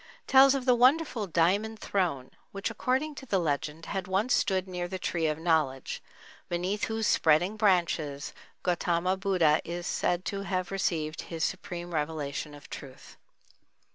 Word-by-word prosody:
tells 270 Hz, 0 st, +7 dB
of 265 Hz, -2 st, -2 dB
the 255 Hz, -, +5 dB
wonderful 250 Hz, -2 st, +3 dB
"Diamond 195 Hz, +6 st, +1 dB
Throne" 170 Hz, -12 st, -1 dB, 0.2 s
which, 195 Hz, 0 st, -3 dB
according 270 Hz, +5 st, -1 dB
to 270 Hz, -1 st, -10 dB
the 200 Hz, -, +2 dB
legend, 155 Hz, -1 st, -2 dB
had 190 Hz, -2 st, -4 dB
once 195 Hz, +7 st, +1 dB
stood 190 Hz, -2 st, +1 dB
near 180 Hz, -1 st, -3 dB
the 190 Hz, +1 st, -4 dB
Tree 170 Hz, -3 st, -1 dB
of 155 Hz, -1 st, -1 dB
Knowledge, 155 Hz, -6 st, 0 dB, 0.5 s
beneath 180 Hz, +4 st, -1 dB
whose 225 Hz, 0 st, -2 dB
spreading 170 Hz, +5 st, +3 dB
branches 170 Hz, -8 st, +1 dB, 0.3 s
Gautama 175 Hz, +1 st, +1 dB
Buddha 180 Hz, -5 st, +2 dB
is 175 Hz, +1 st, -5 dB
said 180 Hz, +1 st, 0 dB
to 200 Hz, 0 st, -3 dB
have 185 Hz, -2 st, -2 dB
received 160 Hz, -5 st, -1 dB
his 165 Hz, -1 st, -3 dB
supreme 175 Hz, -2 st, -4 dB
revelation 150 Hz, -1 st, -3 dB
of 145 Hz, -, -13 dB
truth. 135 Hz, -3 st, -10 dB
180 Hz, 150 wpm, -29 LUFS, 160-200 Hz, 0.5 s, tells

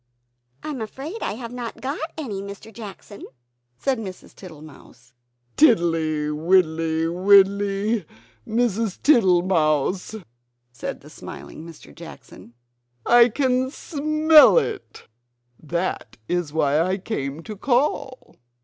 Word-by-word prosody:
"I -, -, -5 dB
am 275 Hz, -6 st, -5 dB
afraid 275 Hz, -, -7 dB
I -, -, -2 dB
have 230 Hz, +1 st, -8 dB
not 245 Hz, -2 st, -7 dB
got 275 Hz, +3 st, -4 dB, 0.2 s
any, 220 Hz, -11 st, -5 dB
Mr. 200 Hz, +2 st, -10 dB
Jackson!" 205 Hz, -1 st, -11 dB, 0.5 s
said 265 Hz, -, -1 dB
Mrs. 190 Hz, -4 st, -9 dB
Tittlemouse. 150 Hz, -8 st, -15 dB, 0.4 s
"Tiddly, 165 Hz, -, +2 dB
widdly, 160 Hz, 0 st, +1 dB
widdly, 200 Hz, +3 st, +3 dB, 0.4 s
Mrs. 225 Hz, -3 st, -1 dB
Tittlemouse!" 180 Hz, -, +2 dB, 0.6 s
said 120 Hz, -, -7 dB
the -, -, -15 dB
smiling 70 Hz, -, -10 dB
Mr. 165 Hz, -2 st, -13 dB
Jackson, 140 Hz, -7 st, -13 dB, 0.5 s
"I 240 Hz, 0 st, +6 dB
can 255 Hz, +1 st, 0 dB
SMELL 305 Hz, -, +4 dB
it; 450 Hz, -4 st, -3 dB, 0.5 s
that 170 Hz, -8 st, -4 dB
is 175 Hz, -4 st, -2 dB
why 150 Hz, -1 st, +1 dB
I 185 Hz, +3 st, 0 dB
came 160 Hz, -7 st, -5 dB
to 215 Hz, -, -8 dB
call." 255 Hz, +3 st, -1 dB
195 Hz, 110 wpm, -22 LUFS, 160-240 Hz, 0.6 s, I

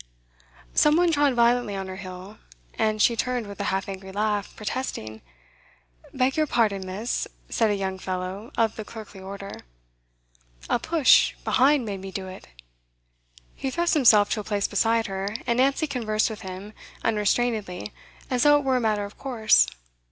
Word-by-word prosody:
Some 300 Hz, 0 st, +4 dB
one 345 Hz, 0 st, +3 dB
trod 290 Hz, -4 st, +2 dB
violently 235 Hz, -3 st, +2 dB
on 195 Hz, -1 st, -4 dB
her 185 Hz, 0 st, -7 dB
heel, 185 Hz, +1 st, -9 dB, 0.3 s
and 215 Hz, 0 st, 0 dB
she 235 Hz, +2 st, +4 dB
turned 245 Hz, 0 st, -1 dB
with 200 Hz, 0 st, -10 dB
a 200 Hz, -, -2 dB
half 195 Hz, -1 st, -1 dB
angry 190 Hz, -1 st, -7 dB
laugh, 205 Hz, 0 st, -1 dB
protesting. 205 Hz, -, -5 dB, 0.9 s
'Beg 260 Hz, +1 st, +1 dB
your 310 Hz, -1 st, +2 dB
pardon, 210 Hz, -7 st, +1 dB
miss,' 210 Hz, +6 st, -2 dB, 0.2 s
said 225 Hz, -2 st, +2 dB
a 205 Hz, -, +1 dB
young 190 Hz, -1 st, -3 dB
fellow 185 Hz, +4 st, -5 dB
of 225 Hz, -1 st, +1 dB
the 215 Hz, -, -4 dB
clerkly 210 Hz, -3 st, -10 dB
order. 195 Hz, +1 st, -7 dB, 1.1 s
'A -, -, +3 dB
push 320 Hz, 0 st, +4 dB
be'ind 270 Hz, 0 st, +3 dB
made 200 Hz, -3 st, -5 dB
me 195 Hz, 0 st, -7 dB
do 190 Hz, 0 st, -5 dB
it.' 185 Hz, -, -10 dB, 1.1 s
He 270 Hz, -, -4 dB
thrust 340 Hz, +5 st, 0 dB
himself 220 Hz, -9 st, +5 dB
to 220 Hz, -, 0 dB
a -, -, -4 dB
place 205 Hz, -1 st, -1 dB
beside 225 Hz, +2 st, +1 dB
her, 195 Hz, +2 st, -4 dB
and 235 Hz, -, +1 dB
Nancy 275 Hz, +4 st, +2 dB
conversed 225 Hz, -6 st, 0 dB
with 215 Hz, -, -8 dB
him 190 Hz, +3 st, -8 dB, 0.3 s
unrestrainedly, 210 Hz, -, 0 dB, 0.4 s
as 250 Hz, -1 st, +1 dB
though 290 Hz, 0 st, +6 dB
it 290 Hz, -, -2 dB
were 265 Hz, -1 st, +2 dB
a -, -, -1 dB
matter 210 Hz, -2 st, 0 dB
of 200 Hz, -, -12 dB
course. 235 Hz, -5 st, +3 dB
215 Hz, 170 wpm, -25 LUFS, 195-245 Hz, 1.1 s, though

